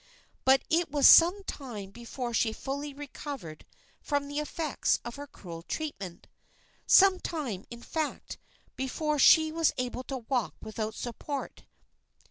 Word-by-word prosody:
But 265 +1 +5
it 335 +1 +1
was 285 -1 +5
some 355 +4 +7
time 225 - -7
before 240 +2 -6
she 225 -1 +1
fully 280 +4 -5
recovered 275 - -8 0.3
from 285 -1 -1
the 290 +1 -3
effects 300 0 -1
of 235 - -6
her 285 0 -7
cruel 170 -10 -10
treatment 195 - -6 0.6
some 385 -1 +7
time, 260 - -4
in 235 0 -10
fact, 315 -2 -4 0.4
before 295 +3 -1
she 315 +3 +7
was 325 0 +2
able 250 0 -3
to 270 - -4
walk 245 -1 -2
without 220 0 -5
support. 270 +4 -6
275 Hz, 135 wpm, -29 LUFS, 235-300 Hz, 0.6 s, some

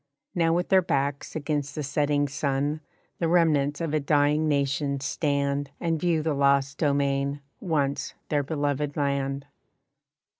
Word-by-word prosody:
Now 165 -2 +2
with 175 +2 0
their 190 -1 +6
backs 140 -4 -1
against 145 -2 -2
the 150 - -3
setting 145 +1 +1
sun 140 +2 -1 0.4
The 170 - +1
remnants 155 -4 +3
of 165 -3 -2
a 155 - +3
dying 150 +1 +2
nation 140 -1 0
stand 140 0 -1
And 165 -2 0
view 165 -2 +1
the 160 -1 0
lost 140 0 +2
domain, 140 -1 +1 0.2
once 145 -5 -1
their 145 -1 +2
beloved 145 0 -2
land. 140 -1 -1
145 Hz, 140 wpm, -26 LUFS, 140-155 Hz, 0.4 s, their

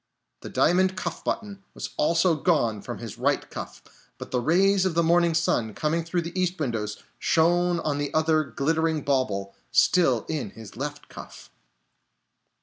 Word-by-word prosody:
The - - -8
diamond 185 +2 +2
cuff 170 -3 -4
button 200 -3 -4
was - - -6
also 170 +3 +3
gone 140 - +1
from - - -6
his - - -8
right - - +1
cuff, - - -8 0.3
but - - -9
the 125 - 0
rays 190 +7 +3
of 185 -3 0
the 170 - +3
morning 170 0 +3
sun, 120 -9 0
coming 160 +2 0
through 170 +1 -2
the 170 +3 -3
east 180 0 -1
windows, 110 -7 -3 0.2
shone 175 +1 +2
on 145 -2 -1
the 145 -1 -2
other 155 0 +2
glittering 155 +3 0
bauble, 105 -8 -1 0.2
still 125 - +3
in 150 -9 -3
his 110 -3 -11
left 145 +4 -6
cuff. - - -12
160 Hz, 160 wpm, -25 LUFS, 135-175 Hz, 0.3 s, also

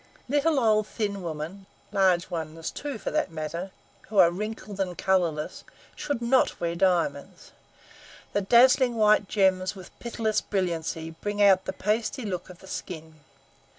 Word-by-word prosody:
Little 290 +2 +2
old 215 -3 +3
thin 200 -3 -3
women, 170 +4 -6 0.2
large 190 -3 +2
ones 160 -1 -4
too, 285 -4 -5
for - - -4
that - - 0
matter, 165 +4 -4 0.4
who 210 - -4
are 170 - +7
wrinkled 210 +1 -6
and 180 -2 -2
colorless, 170 -5 0 0.3
should 285 -5 -3
not 255 +2 +2
wear 170 -1 -1
diamonds. 185 - 0 0.8
The 205 - +1
dazzling 245 +4 +5
white 210 -2 +4
gems 190 -1 +2
with 185 -2 -11
pitiless 225 -2 -1
brilliancy 165 -4 -2
bring 205 +5 -5
out 195 -2 +5
the - - -3
pasty 220 +5 -1
look 185 -3 -4
of 180 - -11
the 190 - -13
skin. 160 -4 -7
195 Hz, 150 wpm, -27 LUFS, 175-215 Hz, 0.8 s, are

